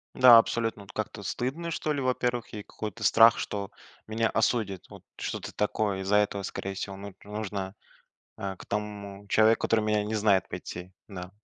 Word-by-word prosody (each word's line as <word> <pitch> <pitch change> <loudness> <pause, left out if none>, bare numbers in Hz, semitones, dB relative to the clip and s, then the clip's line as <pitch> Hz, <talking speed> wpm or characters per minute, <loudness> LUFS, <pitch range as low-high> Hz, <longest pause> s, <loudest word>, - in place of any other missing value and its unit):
Да, 125 -2 +9
абсолютно, 115 -2 +1
вот 100 - -13
как-то 110 -1 -4
стыдно, 135 - -3
что 155 -1 -2
ли, 140 - -2
во 130 -1 +2
первых. 120 -2 -2
И 105 - -6
какой-то 110 +2 -7
страх, 115 +1 +7
что 100 -1 -3 0.4
меня 110 +1 0
осудят. 110 -4 0
Вот, - - -13
что-то - - -5
такое. 105 -2 0
Из-за 95 +2 +1
этого, 100 -1 +1
скорее 95 +1 -4
всего, 95 0 -5
мут 100 0 -9
нужно, 100 -2 -4 0.6
э, 95 -1 -4
к - - -12
тому 100 -1 -5
человеку, 110 +2 +4
который 115 -1 +3
меня 105 -1 +1
не 110 +1 -2
знает, 100 -3 +3
пойти, 90 +1 -7 0.2
да. 90 -2 -8
105 Hz, 180 wpm, -28 LUFS, 100-115 Hz, 0.6 s, Да